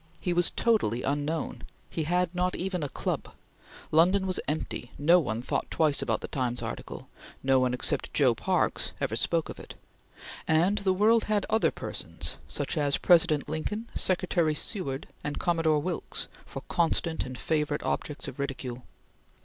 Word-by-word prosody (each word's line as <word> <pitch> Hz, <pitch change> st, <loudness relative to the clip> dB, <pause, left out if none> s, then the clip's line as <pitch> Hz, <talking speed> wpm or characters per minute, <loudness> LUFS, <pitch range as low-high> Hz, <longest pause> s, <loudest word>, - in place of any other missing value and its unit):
He 180 Hz, -, -1 dB
was 175 Hz, 0 st, +3 dB
totally 165 Hz, -, +1 dB
unknown; 145 Hz, +3 st, -2 dB, 0.3 s
he 160 Hz, -, -3 dB
had 180 Hz, +2 st, +1 dB
not 180 Hz, 0 st, 0 dB
even 185 Hz, -1 st, -2 dB
a 145 Hz, -, -2 dB
club; -, -, -3 dB, 0.6 s
London 185 Hz, +5 st, +4 dB
was 185 Hz, -1 st, 0 dB
empty; 150 Hz, -5 st, -3 dB
no 170 Hz, +5 st, +5 dB
one 120 Hz, -7 st, -2 dB
thought -, -, -2 dB
twice 155 Hz, -3 st, +2 dB
about -, -, 0 dB
the -, -, -5 dB
Times 125 Hz, -2 st, -2 dB
article; -, -, -6 dB, 0.4 s
no 135 Hz, 0 st, +4 dB
one 130 Hz, -1 st, +2 dB
except 125 Hz, -, 0 dB
Joe -, -, +4 dB
Parkes -, -, 0 dB
ever -, -, -1 dB
spoke 165 Hz, -2 st, +1 dB
of -, -, -8 dB
it; -, -, -10 dB, 0.7 s
and 175 Hz, +6 st, +3 dB
the 195 Hz, -1 st, +2 dB
world 215 Hz, +4 st, +4 dB
had 210 Hz, -2 st, +1 dB
other 220 Hz, +1 st, +4 dB
persons -, -, -4 dB
such -, -, -2 dB
as 145 Hz, -1 st, +2 dB
President 165 Hz, -5 st, +4 dB
Lincoln, 210 Hz, +9 st, -3 dB
Secretary 175 Hz, -4 st, +1 dB
Seward, 145 Hz, -6 st, -1 dB, 0.2 s
and 150 Hz, 0 st, -3 dB
Commodore 165 Hz, -3 st, +2 dB
Wilkes 175 Hz, -1 st, -2 dB, 0.2 s
for -, -, -7 dB
constant 165 Hz, -1 st, +1 dB
and 130 Hz, 0 st, -7 dB
favorite 150 Hz, 0 st, -1 dB
objects 150 Hz, 0 st, -2 dB
of 135 Hz, 0 st, -8 dB
ridicule. 130 Hz, -3 st, -4 dB
160 Hz, 160 wpm, -28 LUFS, 145-180 Hz, 0.7 s, no